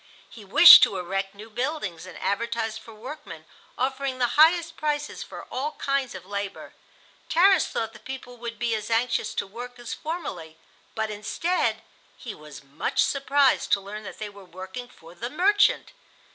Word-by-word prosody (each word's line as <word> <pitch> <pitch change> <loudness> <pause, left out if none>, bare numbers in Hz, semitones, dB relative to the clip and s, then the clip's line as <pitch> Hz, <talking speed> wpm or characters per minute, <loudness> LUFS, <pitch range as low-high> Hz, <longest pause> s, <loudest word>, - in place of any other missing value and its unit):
He 220 - -12
wished 210 - +10
to 195 - +3
erect 195 +2 -3
new 215 +2 -12
buildings, 240 - -3
and 185 - -10
advertised 225 +1 -2
for 225 - -14
workmen, 215 - -10 0.3
offering 265 +1 -2
the 245 -2 +1
highest 330 +2 +4
prices 295 -1 -2
for - - -8
all 290 +4 -3
kinds 275 -5 -2
of 185 -1 -9
labor. 200 0 -6 0.6
Tarras 370 0 +5
thought 225 0 -3
the - - -13
people 260 -2 -8
would 235 -1 -7
be 235 -1 -1
as 215 0 -3
anxious 230 -1 0
to - - -1
work 245 +5 -9
as 240 -1 -6
formerly, 175 - -6 0.4
but 220 -1 -2
instead 270 - -1 0.3
he 230 - -7
was 150 -2 -12
much 140 +2 0
surprised 275 -1 +2
to 200 - +4
learn 200 +2 -8
that 205 - -9
they 215 - -5
were 200 -1 -13
working 190 +7 -8
for 165 +1 -16
the 235 +7 -6
"merchant." 410 - +2
230 Hz, 170 wpm, -25 LUFS, 200-275 Hz, 0.6 s, wished